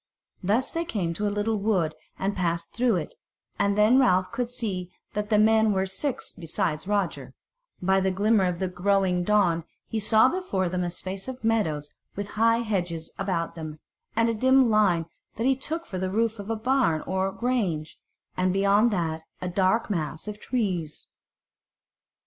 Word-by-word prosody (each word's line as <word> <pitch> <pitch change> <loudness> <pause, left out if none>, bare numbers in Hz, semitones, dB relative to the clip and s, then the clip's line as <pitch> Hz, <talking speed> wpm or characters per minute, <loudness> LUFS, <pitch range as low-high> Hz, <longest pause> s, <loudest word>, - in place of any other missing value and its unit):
Thus 215 +8 +1
they 335 - -1
came 205 - -2
into 205 +5 -2
a - - +2
little 210 +2 0
wood 190 -7 +1 0.2
and 195 +1 -1
passed 170 -2 -1
through 240 -3 +2
it, 170 - -3 0.5
and 200 0 +2
then 215 +5 +5
Ralph 185 -8 +3
could 235 0 -2
see 200 -8 -3 0.2
that 210 0 -2
the 210 - +4
men 220 0 +4
were 190 0 +1
six 240 +8 -3
besides 165 -1 -2
Roger; 165 -11 -1 0.5
by 190 +1 +3
the 190 0 +1
glimmer 200 +1 +3
of 180 -1 -1
the 190 - -1
growing 180 0 +1
dawn 175 -5 +2 0.2
he 225 - -3
saw 220 +3 +5
before 260 - -1
them 180 0 -1
a 175 - -1
space 190 +3 -6
of 260 -1 -7
meadows 160 -10 0 0.2
with 200 0 -4
high 230 +2 +3
hedges 175 -7 -2
about 180 -4 -1
them, 155 -2 -7 0.4
and 230 +1 +3
a 230 - +1
dim 260 +1 +4
line 195 -6 +3 0.3
that 225 - -2
he 265 0 +4
took 320 +5 -4
for 185 - -5
the 185 0 -1
roof 225 +2 0
of 200 +1 -7
a 225 - 0
barn 225 - +1
or 190 +1 0
grange, 195 -11 -2 0.4
and 185 0 +1
beyond 200 +4 +4
that 165 -6 -1 0.2
a 180 - -3
dark 190 +5 +1
mass 160 0 -3
of 210 0 -6
trees. 185 - -2
200 Hz, 180 wpm, -26 LUFS, 180-225 Hz, 0.5 s, then